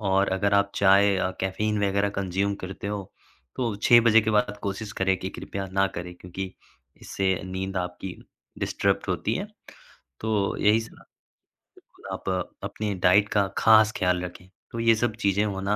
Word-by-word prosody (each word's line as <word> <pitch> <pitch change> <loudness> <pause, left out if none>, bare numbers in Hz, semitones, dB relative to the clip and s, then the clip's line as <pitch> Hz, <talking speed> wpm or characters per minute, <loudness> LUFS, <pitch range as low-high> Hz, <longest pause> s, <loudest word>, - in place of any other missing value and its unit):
और 95 -1 +2
अगर 100 +1 +1
आप 100 0 +3
चाय, 100 0 +5
अ, 95 0 0
कैफ़ीन 105 +3 -1
वगैरह 100 +1 +1
कंज़्यूम 100 +1 -1
करते 95 +2 -7
हो, 100 -2 -5 0.4
तो 120 -5 -1
6:00 120 +3 +6
बजे 115 -1 +6
के 110 - 0
बाद 105 0 +1
कोशिश 100 +2 -4
करें 95 0 +3
कि 95 - -4
कृपया 100 -1 -6
ना 95 0 +3
करें 90 0 -7
क्योंकि 95 +1 -7 0.5
इससे 95 -1 0
नींद 95 +1 -4
आपकी 90 0 -4 0.4
डिसरप्ट - - 0
होती - - -1
है। - - -3 0.7
तो 105 -3 0
यही 105 +2 +4
सलाह 110 - -12 0.7
बिल्कुल, - - -21
आप - - -5 0.3
अपनी 105 -1 -3
डाइट 100 +3 +5
का 100 -2 +2
खास 110 -1 +6
ख़्याल 90 -1 +1
रखें, 90 +1 -11 0.2
तो 115 - -5
ये 115 0 +5
सब 110 -1 -1
चीजें 100 +1 +2
होना 100 0 -1
100 Hz, 170 wpm, -26 LUFS, 95-105 Hz, 0.7 s, 6:00